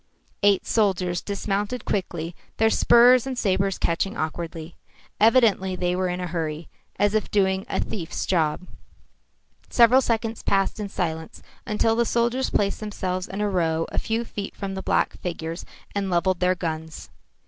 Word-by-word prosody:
Eight 200 Hz, -1 st, +3 dB
soldiers 185 Hz, -5 st, +1 dB
dismounted 205 Hz, +3 st, -3 dB
quickly, 170 Hz, -3 st, -3 dB, 0.2 s
their 220 Hz, 0 st, +3 dB
spurs 245 Hz, +3 st, +6 dB
and 260 Hz, -2 st, -4 dB
sabres 195 Hz, -3 st, +1 dB
catching 195 Hz, +6 st, -1 dB
awkwardly. 160 Hz, +1 st, -4 dB, 0.4 s
Evidently 215 Hz, -5 st, +4 dB
they 180 Hz, 0 st, 0 dB
were 185 Hz, 0 st, 0 dB
in 180 Hz, 0 st, -3 dB
a 180 Hz, -, -3 dB
hurry, 165 Hz, -2 st, -4 dB, 0.3 s
as 205 Hz, 0 st, +2 dB
if 215 Hz, -1 st, 0 dB
doing 190 Hz, 0 st, +1 dB
a -, -, -1 dB
thief's 175 Hz, -7 st, -3 dB
job. 165 Hz, -1 st, 0 dB, 1.0 s
Several 245 Hz, +2 st, +6 dB
seconds 230 Hz, -2 st, -1 dB
passed 195 Hz, +2 st, +1 dB
in 205 Hz, -1 st, -4 dB
silence 160 Hz, -4 st, -4 dB, 0.2 s
until 225 Hz, +1 st, +2 dB
the 235 Hz, -, +3 dB
soldiers 240 Hz, +3 st, +1 dB
placed 200 Hz, -1 st, 0 dB
themselves 185 Hz, -4 st, -3 dB
in 195 Hz, +3 st, -5 dB
a 210 Hz, -, +1 dB
row 165 Hz, -4 st, 0 dB
a -, -, 0 dB
few 225 Hz, +1 st, -2 dB
feet 205 Hz, -3 st, -6 dB
from 195 Hz, -1 st, -5 dB
the 190 Hz, -, -4 dB
black -, -, 0 dB
figures 165 Hz, -1 st, -5 dB, 0.3 s
and 200 Hz, -1 st, -1 dB
levelled 180 Hz, +1 st, +1 dB
their 180 Hz, 0 st, +2 dB
guns. 160 Hz, -2 st, -5 dB
195 Hz, 160 wpm, -24 LUFS, 175-215 Hz, 1.0 s, spurs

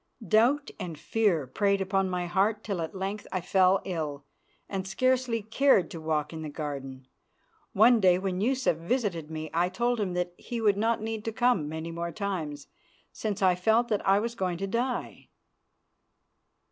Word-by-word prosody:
Doubt 245 Hz, -, +3 dB
and 175 Hz, -5 st, -5 dB
fear 180 Hz, -3 st, +1 dB
preyed 200 Hz, +8 st, +1 dB
upon 195 Hz, 0 st, 0 dB
my 180 Hz, -1 st, -2 dB
heart 200 Hz, +5 st, +1 dB
till 195 Hz, -5 st, -3 dB
at 160 Hz, +4 st, -5 dB
length 195 Hz, +2 st, -4 dB
I 185 Hz, -, -1 dB
fell 185 Hz, +2 st, +3 dB
ill 150 Hz, -6 st, -4 dB, 0.4 s
and 190 Hz, -1 st, -4 dB
scarcely 245 Hz, +2 st, +1 dB
cared 220 Hz, -, +3 dB
to 165 Hz, -, -7 dB
walk 155 Hz, 0 st, -1 dB
in 160 Hz, -, -6 dB
the 155 Hz, -, -5 dB
garden. 135 Hz, -3 st, -6 dB, 0.7 s
One 230 Hz, +3 st, +6 dB
day 185 Hz, -3 st, +5 dB
when 185 Hz, 0 st, -2 dB
Yusuf 255 Hz, -6 st, +1 dB
visited 170 Hz, -, -2 dB
me 155 Hz, -1 st, -6 dB
I 175 Hz, +2 st, +2 dB
told 240 Hz, +5 st, 0 dB
him 195 Hz, -4 st, -1 dB
that 180 Hz, 0 st, -2 dB
he 240 Hz, -, -5 dB
would 210 Hz, -3 st, +3 dB
not 225 Hz, +2 st, 0 dB
need 220 Hz, -1 st, -4 dB
to 225 Hz, -, -1 dB
come 230 Hz, -9 st, +1 dB
many 160 Hz, +1 st, -5 dB
more 170 Hz, +1 st, -4 dB
times, 160 Hz, -8 st, -4 dB, 0.5 s
since 205 Hz, -2 st, -3 dB
I 185 Hz, -1 st, +5 dB
felt 220 Hz, +7 st, +2 dB
that 210 Hz, -2 st, 0 dB
I 195 Hz, +1 st, +4 dB
was 230 Hz, +3 st, -1 dB
going 185 Hz, -6 st, -2 dB
to 195 Hz, -, -3 dB
die. 240 Hz, +5 st, -3 dB
190 Hz, 175 wpm, -28 LUFS, 170-220 Hz, 0.7 s, One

